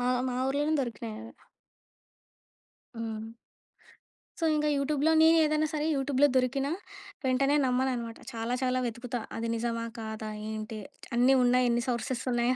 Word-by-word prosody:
మా 245 - 0 0.2
మా 250 - -2
ఊర్లోనే 290 +3 +1
దొరికినాయి 230 -3 -4
అవి. 225 +1 -10 1.6
హ్మ్. 225 -1 -5 1.1
సో, - - 0
ఇంకా 300 0 +1
యూట్యూబ్‌లోనే 295 +3 +2
నేనే 325 +1 +6
ఏదైనా 305 0 +1
సరే 305 0 -1
యూట్యూబ్‌లోనే 275 0 +3
దొరికినా 270 +2 +1 0.5
వెంటనే 275 +3 +3
నమ్మననమాట. 250 -2 0 0.2
చాలా 230 +1 -2
చాలా 255 0 +1
వెతుకుతా. 240 +1 -4 0.2
అది 230 0 -2
నిజమా? 230 0 -2
కాదా? 220 -1 -5 0.2
ఏంటి 215 0 -5 0.4
అన్నీ 255 +3 +5
ఉన్నాయి? 250 0 +4
ఎన్ని 240 0 +1
సోర్సెస్ 240 0 -2
ఉన్నాయ? 240 +1 +2
250 Hz, 135 wpm, -29 LUFS, 230-275 Hz, 1.6 s, నేనే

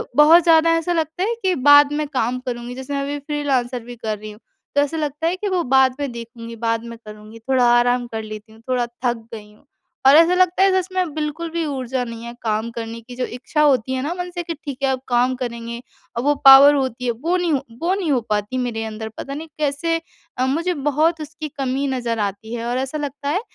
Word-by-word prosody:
बहुत 315 +3 +7
ज़्यादा 330 -1 +5
ऐसा 340 +2 -1
लगता 325 +2 -1
है 450 +4 0
कि 375 -1 +2
बाद 290 +1 +7
में 300 0 -1
काम 255 -3 -1
करूँगी 245 -1 -6
जैसे 265 +2 -6
मैं 280 - -1
अभी 285 +1 -3
फ्रीलांसर 275 -4 -1
भी 245 +1 -9
कर 220 -2 -4
रही 215 0 -8
हूँ, 210 - -14 0.4
तो 285 - +5
ऐसा 290 +3 -1
लगता 300 +1 -2
है 345 - 0
कि 410 +3 -4
वो 365 -2 0
बाद 265 -1 +3
में 285 -3 -2
देखूँगी, 230 0 -9
बाद 230 0 -1
में 235 0 -8
करूँगी 215 +1 -11
थोड़ा 255 -2 +4
आराम 245 0 +1
कर 220 -1 -4
लेती 215 0 -9
हूँ, 225 - -18
थोड़ा 250 -1 +1 0.2
थक 240 -1 +1 0.2
गई 210 -1 -9
हूँ। 250 - -25 0.4
और 275 - +8
ऐसा 335 +2 +6
लगता 365 +1 +3
है 390 - +5
जैसे 375 0 -1
मैं 365 -5 0
बिल्कुल 310 +2 -3
भी 335 -1 -1
ऊर्जा 260 -3 -2
नहीं 230 -1 -7
है 235 - -7
काम 220 +1 -1
करने 230 0 -6
की, 245 +2 -11
जो 255 - -2
इच्छा 255 +5 -3
होती 260 -4 +3
है 260 - -1
ना 310 +4 -2
मन 360 0 -3
से 350 - -3
कि 335 - -4
ठीक 280 -3 -5
है 270 - +3
अब 260 - -1
काम 245 +1 +2
करेंगे 235 -1 -5 0.4
वो 290 +1 +3
पावर 275 +2 +10
होती 260 -3 -2
है 240 - +2
वो 305 +10 -1
नहीं 350 -2 0 0.3
वो 355 +3 +1
नहीं 365 -6 -1
हो 255 -3 +2
पाती 210 +4 -1
मेरे 240 -3 -2
अंदर 220 0 -6
पता 275 - -6
नहीं 310 +3 -6
कैसे 305 +3 0 0.4
अ, 255 - +1
मुझे 330 +7 0
बहुत 315 +3 +2
उसकी 310 0 -7
कमी 270 +1 -1
नज़र 240 -3 -2
आती 205 +2 -3
है 235 0 -4
और 245 +1 -1
ऐसा 265 +3 -3
लगता 285 -1 -4
है 365 +7 0
265 Hz, 235 wpm, -21 LUFS, 235-305 Hz, 0.4 s, पावर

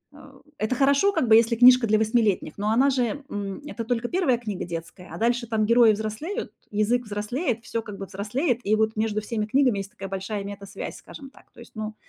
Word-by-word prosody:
э, - - -15 0.2
это 220 +4 0
хорошо 280 +9 +3
как 260 - 0
бы, 220 - +7
если 230 +1 +4
книжка 250 0 +7
для 215 - +3
восьмилетних, 220 -7 +1
но 205 +1 -1
она 260 +5 +4
же, 260 +2 -1
м, 200 +1 -5
это 235 -5 -5
только 240 0 -1
1 345 -10 +2
книга 210 -5 -5
детская, 170 +2 -8
а - - -7
дальше 235 +1 0
там 220 -2 0
герои 235 0 +6
взрослеют, 220 - -4 0.2
язык 215 +4 +1
взрослеет, 225 +4 -3
всё 230 - -3
как 210 -2 -9
бы 195 - -6
взрослеет, 220 - -2
и 215 - +3
вот 220 0 0
между 215 -1 -1
всеми 215 0 -3
книгами 250 -3 +2
есть 195 - -6
такая 195 -1 -8
большая 195 +2 -4
метасвязь, 200 0 -7
скажем 275 -1 -12
так, - - -21
то - - -19
есть, - - -13
ну 215 0 -5
220 Hz, 215 wpm, -25 LUFS, 205-245 Hz, 0.2 s, бы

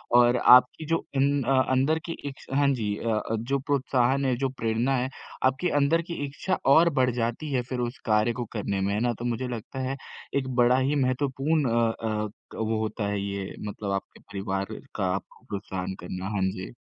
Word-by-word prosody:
और 120 0 +6
आपकी 125 +5 +6
जो 165 +1 0
इन 140 +1 +3
अ, 130 +1 +3
अंदर 140 +5 +3
की 165 - -3 0.2
इच्छा 135 -1 -8
हाँ 145 -1 +4
जी 105 -5 -1
अ 115 - -3 0.2
अ, - - +2
जो 135 +4 -1
प्रोत्साहन 135 -1 +1
है 130 -2 +2
जो 135 +1 0
प्रेरणा 120 +1 0
है, 125 +1 -1 0.4
आपकी 135 +7 +2
अंदर 165 +4 +3
की 170 - -2
इच्छा 145 +7 -2 0.2
और 170 +3 +6
बढ़ 125 -1 +4
जाती 120 +6 -2
है 125 - +2
फिर 125 - -2
उस 120 +1 -2
कार्य 110 +1 +3
को 120 +1 -4
करने 100 -2 -1
में, 100 +1 0
है 105 - 0
ना? 120 0 +1
तो 120 - -7
मुझे 120 +1 -1
लगता 120 +2 -6
है 135 - -2 0.4
एक 135 -2 0
बड़ा 120 +1 +5
ही 135 +3 +1
महत्वपूर्ण 135 +2 +1
अ 115 0 +3
अ, 110 -1 -1 0.3
वो 110 0 -1
होता 110 -1 -2
है 100 -1 -1
ये 100 -1 -4
मतलब 100 -1 -4
आपके 95 0 -4
परिवार 95 -1 -3 0.3
का 100 - 0
आपको 100 - -9
प्रोत्साहन 95 -2 -4
करना, 90 +1 -6
हाँ 100 - 0
जी। 95 0 -7
125 Hz, 205 wpm, -27 LUFS, 110-135 Hz, 0.4 s, और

